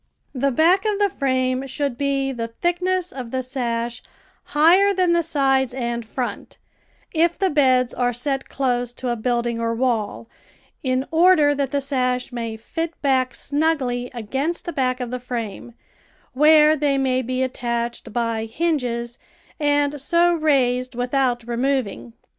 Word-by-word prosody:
The 275 +1 +1
back 335 +8 +3
of 425 -2 0
the 405 -1 +2
frame 260 -1 0
should 275 -1 -2
be 275 0 0
the 230 -3 -4
thickness 360 +7 -1
of 255 -3 -7
the 260 +1 -2
sash 240 -2 -3 0.4
higher 365 +7 +4
than 360 -2 +2
the 340 - +3
sides 270 -5 +1
and 235 -2 -2
front, 245 +3 -5 0.6
if 335 +1 +2
the 385 -1 +1
beds 255 -4 +3
are 245 -1 0
set 270 +3 -3
close 245 -3 -1
to 250 0 -4
a 240 - 0
building 235 0 -1
or 230 0 -1
wall, 230 -3 -1 0.5
in 260 0 0
order 325 -3 +5
that 280 -2 -1
the 280 0 -1
sash 255 -2 -1
may 230 -2 -4
fit 330 +8 -5
back 260 -2 +1
snugly 280 -5 -1
against 265 +8 -3
the 345 - -4
back 255 -2 0
of 245 -1 -4
the 250 - -3
frame, 235 -2 -6 0.6
where 305 +2 +6
they 285 -2 +1
may 260 -1 +1
be 255 +1 -1
attached 235 -2 -3
by 230 -1 -1
hinges 240 -3 -2 0.4
and 290 -1 +1
so 345 +4 +3
raised 255 -6 +1
without 245 -1 0
removing. 235 - -2
260 Hz, 150 wpm, -22 LUFS, 245-295 Hz, 0.6 s, where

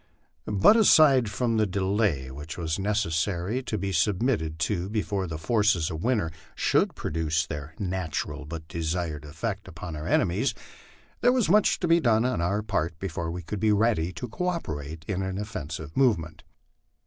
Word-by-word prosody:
But 105 - +5
aside 150 - +6
from 115 +2 0
the 110 -1 +3
delay 95 -8 0
which 75 +4 -8
was 80 0 -2
necessary 95 +2 0
to 115 -4 -3
be 100 -1 -2
submitted 95 -2 +1
to 95 -2 -2
before 100 -3 -1
the 80 -2 -4
forces 105 -3 +2
of 80 0 -5
winter 110 -10 +1 0.2
should - - +2
produce 80 +1 -1
their 75 +1 -7
natural 85 -5 -3
but 80 0 -7
desired 80 -2 -3
effect 75 +2 -4
upon 80 0 -7
our 75 +1 -5
enemies, 90 -1 +1 0.6
there 245 - +4
was 250 -9 +2
much 210 +3 +4
to 175 - +1
be 170 +1 +5
done 115 -5 +3
on 125 -8 0
our 100 +5 0
part 90 -6 -1
before 85 -2 -4
we 90 +1 -5
could 100 +5 -5
be 110 +1 +3
ready 105 -5 +2
to 125 - -5
cooperate 80 - -4
in 95 -2 -1
an 95 0 -3
offensive 80 -7 -6
movement. 85 - +1
95 Hz, 165 wpm, -27 LUFS, 80-110 Hz, 0.6 s, aside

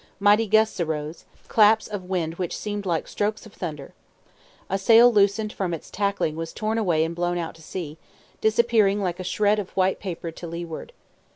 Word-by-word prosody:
Mighty 205 +2 +4
gusts 220 0 +3
arose 155 -1 -3 0.2
claps 220 0 +4
of 205 -3 -6
wind 170 -3 -2
which 180 -2 -2
seemed 205 -2 -4
like 165 -3 -1
strokes 210 +2 -2
of 215 - -14
thunder. 150 -6 -6 0.7
A 195 - -1
sail 230 +4 +6
loosened 210 +1 +2
from 180 -4 -2
its 160 - -12
tackling 200 -6 -1
was 165 0 -5
torn 220 +1 -1
away 170 -7 +2
and 165 +1 -5
blown 175 0 -1
out 165 -2 -4
to 165 - -17
sea, 160 -2 -7 0.4
disappearing 220 -2 +3
like 180 -3 -2
a - - -4
shred 210 +3 +1
of 195 - -5
white 190 0 +2
paper 170 -3 -5
to 170 +1 -9
leeward. 170 - -6
190 Hz, 185 wpm, -24 LUFS, 170-210 Hz, 0.7 s, sail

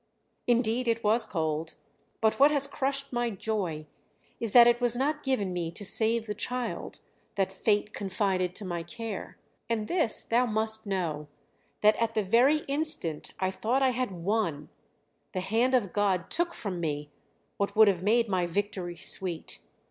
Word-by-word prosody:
"Indeed 240 0 +2
it 230 0 +1
was 220 +2 +2
cold; 160 -3 -2 0.5
but 220 +2 +2
what 285 +2 +8
has 285 -2 +2
crushed 275 -1 -2
my 240 0 0
joy 190 -7 -3 0.5
is 230 -3 -1
that 240 +1 +9
it 240 +1 +3
was 245 -1 +3
not 295 +3 0
given 210 -9 -1
me 175 -2 -2
to 205 - -6
save 225 +3 +3
the 210 - -3
child 245 +3 -4 0.3
that 190 -1 0
Fate 210 +2 0
confided 190 -2 -1
to 210 - -5
my 175 -2 -3
care; 225 +3 -7 0.3
and 220 -2 -1
this 325 -11 +2
thou 245 +2 +2
must 220 0 -2
know: 165 -6 -2 0.5
that 215 +1 +5
at 230 -1 -1
the 215 - +2
very 250 +10 +4
instant 280 - -1
I 185 0 0
thought 245 +7 0
I 260 - +4
had 255 -1 -1
won, 175 -4 -2 0.6
the 185 - -2
Hand 230 +7 +2
of 205 -8 0
God 195 -4 0
took 340 0 -1
from 190 -5 -4
me 150 -3 -3 0.5
what 200 - -1
would 220 0 +7
have 185 -3 +2
made 230 +4 +3
my 185 -3 0
victory 185 -1 -3
sweet. 175 -1 -2
215 Hz, 170 wpm, -28 LUFS, 185-240 Hz, 0.6 s, that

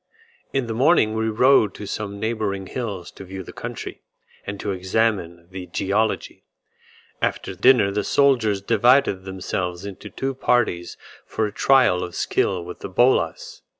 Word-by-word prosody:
In 135 -2 0
the 115 - -4
morning 125 -3 +3
we 110 0 0
rode 110 -1 +4
to 105 - -7
some 100 0 -5
neighbouring 105 -3 -2
hills 100 -6 -5
to - - -11
view 95 0 -7
the - - -11
country, - - -7 0.5
and 100 0 -5
to 105 - -2
examine 95 -3 -1
the 95 -1 -7
geology. 100 +5 -1 0.8
After - - -1
dinner 105 +1 +4
the 105 +1 -1
soldiers 115 -9 +2
divided 115 -3 +3
themselves 95 -1 -4
into 100 -2 -8
two 135 0 -3
parties 120 -9 0 0.3
for 110 - -1
a 105 - -3
trial 115 -7 +3
of 90 -1 -7
skill 90 -3 0
with 90 - -9
the - - -7
bolas. - - +1
105 Hz, 150 wpm, -22 LUFS, 95-120 Hz, 0.8 s, rode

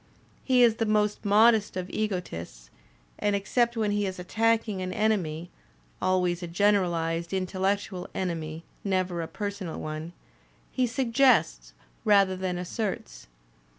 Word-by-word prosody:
He 255 -2 +4
is 225 -2 +4
the 225 - 0
most 210 0 +1
modest 215 0 +4
of 180 -1 -3
egotists, 85 - -4 0.5
and, 205 -1 +1
except 235 +4 +1
when 215 -2 +1
he 205 -1 0
is 185 - -5
attacking 220 +2 0
an 185 0 -3
enemy 180 -6 -1 0.5
(always 180 -1 +1
a 175 - -4
generalized 170 -3 +1
intellectual 190 0 -1
enemy, 165 -3 -3 0.2
never 185 -3 0
a 165 - -4
personal 200 -4 -5
one), 155 +2 -5 0.6
he 255 -1 +1
suggests 230 - +2 0.3
rather 200 -3 +4
than 185 -1 -2
asserts. 175 - -4
190 Hz, 125 wpm, -27 LUFS, 175-215 Hz, 0.6 s, He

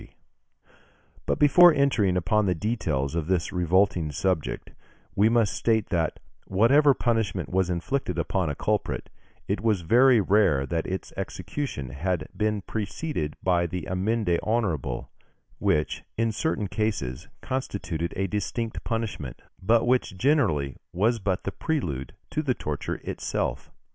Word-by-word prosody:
] - - -31
But - - +1
before 175 +4 +7
entering 125 - +2
upon 105 +4 +2
the 90 - +2
details 80 - -1
of 85 -2 -2
this 90 -2 0
revolting 90 -2 +2
subject, 90 +2 -2 0.4
we 105 +3 +4
must 115 -3 +2
state 110 -2 +1
that, 85 -4 0 0.3
whatever 135 +9 +5
punishment 110 -6 0
was 95 -1 +1
inflicted 90 +11 -2
upon 95 -5 0
a 75 - -3
culprit, - - -2 0.4
it - - -1
was 110 -5 +1
very 120 +8 +5
rare 95 -9 +3
that 80 +3 -2
its 95 0 -4
execution 130 - -4
had 90 +7 -1
not - - -11
been 105 -1 0
preceded 105 - -3
by 85 -2 +2
the 90 -1 -5
amende 95 -1 0
honorable, 105 - -1 0.5
which, 75 0 0
in 115 0 +1
certain 110 -1 -1
cases, 85 - -2 0.2
constituted 100 -10 -3
a 95 - +1
distinct 110 +4 -3
punishment, 110 - -3 0.2
but 115 +4 +3
which 125 -6 +1
generally 85 - +2
was 110 +7 +1
but 95 -2 -1
the 100 - -2
prelude 80 - -3 0.2
to 155 - 0
the 130 -5 0
torture 75 -2 -4
itself. - - -3
95 Hz, 140 wpm, -26 LUFS, 85-115 Hz, 0.5 s, before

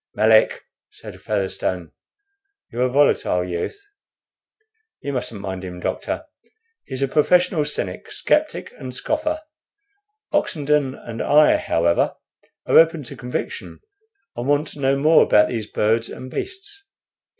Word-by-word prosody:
"Melick," 110 0 +4 0.3
said - - -12
Featherstone, 95 -4 -2 0.8
"you're 120 - -3
a 130 - +3
volatile 125 -9 +2
youth. 90 - -4 1.2
You 140 - -4
mustn't 120 -4 -4
mind 95 -1 -5
him, 90 -1 -7
doctor. - - -3 0.6
He's 130 0 -4
a - - +2
professional 160 +2 +3
cynic, 100 -11 -4
sceptic, - - 0
and 130 -1 -7
scoffer. 310 - -2 0.9
Oxenden 145 -3 +1
and 115 -1 -7
I, 150 +1 +5
however, 85 +1 +1 0.5
are - - +6
open 165 -2 +4
to 120 - -9
conviction, 125 +2 -5 0.6
and 120 +2 -4
want 145 +1 +2
to - - -11
know 135 0 +2
more 155 +3 +5
about 105 0 +5
those 115 -4 -3
birds 115 +2 0
and 130 0 -9
beasts. 395 - -6
130 Hz, 130 wpm, -22 LUFS, 105-150 Hz, 1.2 s, are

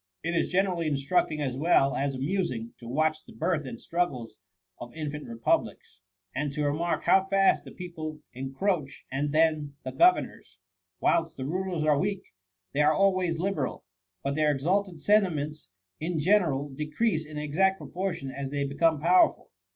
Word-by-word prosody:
It 170 +1 -1
is 165 - +1
generally 180 -3 +1
instructing 150 +2 0
as 130 -3 -2
well 140 -2 +3
as 140 0 -1
amusing 130 -6 -2
to 120 - -10
watch 155 +4 0
the - - -15
birth 155 -6 -1
and 115 - -7
struggles 140 -11 -2 0.4
of 120 +3 -9
infant 150 -2 -5
republics; 115 -5 -1 0.3
and 145 +1 -2
to 150 0 -1
remark 160 +4 0
first - - -17
how 190 0 +5
fast 195 0 +3
the - - -10
people 160 -4 -7
encroach, 135 +3 -2
and 140 +2 -1
then 155 -2 +2
the 130 - -4
governors. 345 - +2 0.4
Whilst 165 -1 +1
the 130 - -4
rulers 180 +1 -2
are 150 -2 +3
weak, 195 +2 -1 0.5
they 145 - +2
are 150 +1 +5
always 185 -3 +2
liberal; 175 -6 -2 0.4
but 140 - -1
their 150 0 +2
ex 135 -2 -3
alted 185 0 0
sentiments 155 - +1 0.3
in 165 +2 -2
general 155 -5 +2
decrease 155 +6 -1
in 150 -1 -9
exact 180 +6 +1
proportion 180 -8 -4
as 135 0 -5
they 140 0 -1
become 150 +3 +2
powerful. 175 +4 +3
155 Hz, 165 wpm, -28 LUFS, 140-180 Hz, 0.5 s, how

